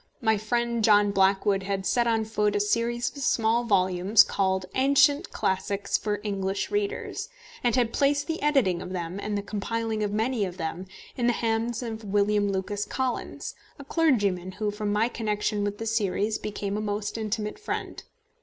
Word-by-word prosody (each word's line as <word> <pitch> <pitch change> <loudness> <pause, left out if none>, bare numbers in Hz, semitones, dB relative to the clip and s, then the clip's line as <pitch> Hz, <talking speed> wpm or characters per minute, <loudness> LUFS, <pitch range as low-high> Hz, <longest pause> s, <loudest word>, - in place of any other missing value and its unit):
My 220 -4 +3
friend 235 +2 -1
John 205 -1 +5
Blackwood 195 0 +3
had 195 0 -3
set 240 +3 +2
on 225 -1 +1
foot 210 -1 0
a - - +2
series 235 +3 0
of 280 - -7
small 230 -2 +2
volumes 190 0 +4
called 190 -1 0
Ancient 280 +5 +4
Classics 195 +1 -1
for 210 -1 -1
English 195 -2 -2
Readers, 410 0 -2 0.3
and 240 -1 +2
had 240 -3 +1
placed 285 0 +2
the 325 0 -3
editing 265 -13 +2
of 185 - -6
them, 175 +1 -4
and 210 0 -2
the 200 - -3
compiling 220 +2 -2
of 205 -1 0
many 220 +2 0
of 185 -2 -4
them, 170 +2 -4 0.3
in 240 -2 0
the 240 - +4
hands 230 +1 -1
of 225 -1 -5
William 205 0 +1
Lucas 200 +2 -2
Collins, 260 -2 -3 0.2
a 280 - -9
clergyman 205 - +1
who, 210 0 -2
from 210 0 -3
my 210 +2 +2
connection 210 -3 -1
with 205 0 -2
the 225 - -5
series, 215 -1 0
became 205 -1 -3
a - - -2
most 205 0 -3
intimate 215 -1 -3
friend. 425 - -4
210 Hz, 175 wpm, -26 LUFS, 200-235 Hz, 0.3 s, John